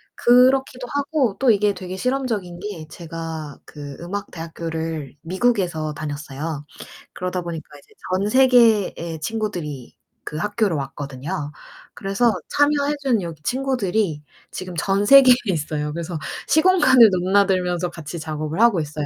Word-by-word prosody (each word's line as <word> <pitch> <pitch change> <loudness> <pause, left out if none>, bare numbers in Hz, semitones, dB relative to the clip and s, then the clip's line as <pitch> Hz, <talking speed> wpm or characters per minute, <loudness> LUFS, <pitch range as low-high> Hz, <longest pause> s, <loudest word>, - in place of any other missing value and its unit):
그렇기도 255 +1 +3
하고 285 -6 0
또 260 -2 +3
이게 205 -1 +2
되게 185 0 -7
실험적인 220 -7 -2
게 185 -6 -7
제가 165 -3 -7
그 145 -2 -9
음악 200 +4 -5
대학교를 160 -3 -5
미국에서 180 -5 0
다녔어요. 145 0 -5 0.5
그러다 180 0 -3
보니까 170 -2 -7
이제 - - -23 0.2
전 195 +3 +1
세계의 225 -10 +3
친구들이 170 - -4 0.3
그 - - -7
학교로 210 -1 0
왔거든요. 145 +3 -5 0.4
그래서 205 +4 +1 0.2
참여해 290 0 +2
준 245 -7 +1
여기 165 -3 -7
친구들이 220 - -1 0.3
지금 185 -1 -7
전 195 +5 0
세계에 265 +1 +8
있어요. 150 -4 -2
그래서 170 0 -4 0.3
시공간을 305 - +6
넘나들면서 185 -1 +1
같이 165 0 -7
작업을 155 +2 -4
하고 230 -8 +4
있어요. 150 0 -4
180 Hz, 320 characters per minute, -22 LUFS, 160-230 Hz, 0.5 s, 세계에